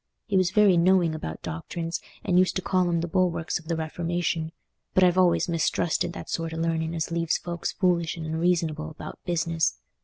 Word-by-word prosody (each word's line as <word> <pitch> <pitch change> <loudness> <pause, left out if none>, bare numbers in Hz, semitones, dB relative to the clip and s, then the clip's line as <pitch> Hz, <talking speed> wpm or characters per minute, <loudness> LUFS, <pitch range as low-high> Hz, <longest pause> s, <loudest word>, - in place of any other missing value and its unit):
He 205 - -2
was 185 -2 +4
very 200 -2 +5
knowing 175 -1 +4
about 80 - -6
doctrines, 165 - -4 0.2
and 180 0 +3
used 185 - +2
to 185 - -2
call 185 -2 +2
'em 170 -1 +1
the 170 - -2
bulwarks 175 -2 0
of 160 - -17
the 165 - 0
Reformation; 165 0 -2 0.4
but 185 - +5
I've 180 -1 +5
always 185 -1 +3
mistrusted 170 0 0
that - - -8
sort 165 -1 -3
o' - - -5
learning 165 0 -1
as 160 0 -2
leaves 165 -1 +1
folks 170 -1 -4
foolish 175 -3 +1
and 165 - -5
unreasonable 160 -1 0
about 155 - -9
business. 165 - 0
170 Hz, 190 wpm, -26 LUFS, 160-180 Hz, 0.4 s, very